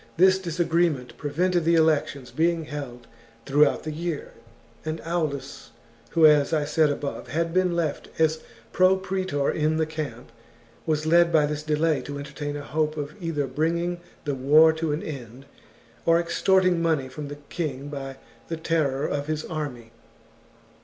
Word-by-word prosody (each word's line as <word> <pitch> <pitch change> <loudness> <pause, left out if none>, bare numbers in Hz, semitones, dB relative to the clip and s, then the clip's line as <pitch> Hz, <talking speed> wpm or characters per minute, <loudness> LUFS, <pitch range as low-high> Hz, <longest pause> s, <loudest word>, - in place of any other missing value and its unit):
This 190 +2 +5
disagreement 170 -6 0
pre 145 - -5
vented 175 +3 +1
the 170 +1 +3
elections 150 -5 +1
being 165 0 +1
held 140 -5 -7 0.4
throughout 145 +1 +3
the 155 - -4
year, 165 -1 -4 0.5
and 155 +1 -3
Aulus, 155 -5 -3 0.4
who, 165 -2 +6
as 150 0 +5
I 150 -2 +2
said 150 +1 +3
above, 145 0 -4
had 165 +1 -1
been 185 -1 +2
left 160 -4 -2
as 160 0 +2 0.3
pro 185 +1 +5
praetor 190 -7 -1
in 155 0 0
the 160 - +2
camp, 150 -7 -6 0.6
was 155 -1 0
led 170 +1 +5
by 155 -3 +4
this 150 0 -3
delay 155 0 +1
to 145 0 -6
entertain 145 +1 -5
a 145 - -6
hope 155 +1 -1
of 145 0 -4
either 160 -4 -1
bringing 170 +6 -1 0.3
the 145 - -1
war 150 +5 +5
to 160 -1 -2
an 150 - -2
end, 130 -3 -8 0.6
or 165 0 +4
extort 190 +2 +2
ing 175 -2 +2
money 160 -5 +1
from 145 +3 -7
the 145 0 -7
king 145 -4 -4
by 135 -2 -6 0.3
the 165 - -3
terror 155 -4 0
of 145 0 -2
his 155 0 -2
army. 135 -8 -5
155 Hz, 165 wpm, -25 LUFS, 145-165 Hz, 0.6 s, who